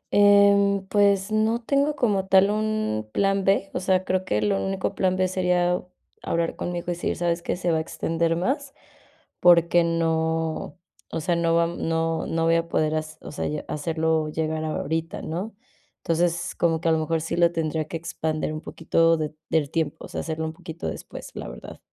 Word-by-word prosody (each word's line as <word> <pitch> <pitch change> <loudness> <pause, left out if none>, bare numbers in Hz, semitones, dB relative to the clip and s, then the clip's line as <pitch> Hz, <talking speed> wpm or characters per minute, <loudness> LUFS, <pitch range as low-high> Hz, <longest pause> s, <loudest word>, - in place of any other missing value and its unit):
Em, 200 -1 +5
pues 200 -1 +3
no 220 +2 +2
tengo 280 +3 +1
como 200 -5 +1
tal 195 +1 +5
un 215 - -1
plan 195 -1 +1
B, 195 0 +2
o - - -1
sea, 185 0 +1
creo 185 0 0
que 105 0 0
lo 100 -2 +1
único 95 +1 -2
plan 185 -1 +1
B 185 0 +2
sería 180 -1 +1 0.4
hablar 165 0 -1
con 175 - -4
mi 175 - -3
hijo 175 - -4
y - - +1
decir: 170 - -2
"¿Sabes 170 0 -1
qué?, - - -2
se 175 -1 -1
va 160 - +2
a - - 0
extender 165 +1 -1
más", 270 - -2 0.6
porque 170 0 +5
no 160 -2 -1 0.3
o - - -2
sea, 175 +1 +1
no 165 0 +2
vam 170 0 +1
no 165 0 0
no 165 0 0
voy 165 0 +4
a 165 0 0
poder 155 -1 +1
hac 155 0 -1 0.2
o - - -9
sea - - -3
ya 150 0 -4
hacerlo 160 0 0
llegar 155 0 -2
ahorita, 160 +1 -3
¿no?, 190 +7 -4 0.5
entonces, 170 +2 0
como 165 -2 +2
que 165 - +1
a - - +4
lo 160 - +2
mejor 160 +1 0
sí 165 +1 -3
lo 170 -1 +4
tendría 160 -2 -2
que 165 - -4
expandir 160 -2 -3
un 155 - -5
poquito 165 0 +2
de 155 -1 -3 0.2
del 150 -3 +1
tiempo, 160 -3 -2
o - - -9
sea, - - -4
hacerlo 160 0 -3
un 160 - -4
poquito 165 +1 -7
después, - - -7
la - - -6
verdad. - - -10
170 Hz, 200 wpm, -24 LUFS, 160-190 Hz, 0.6 s, Em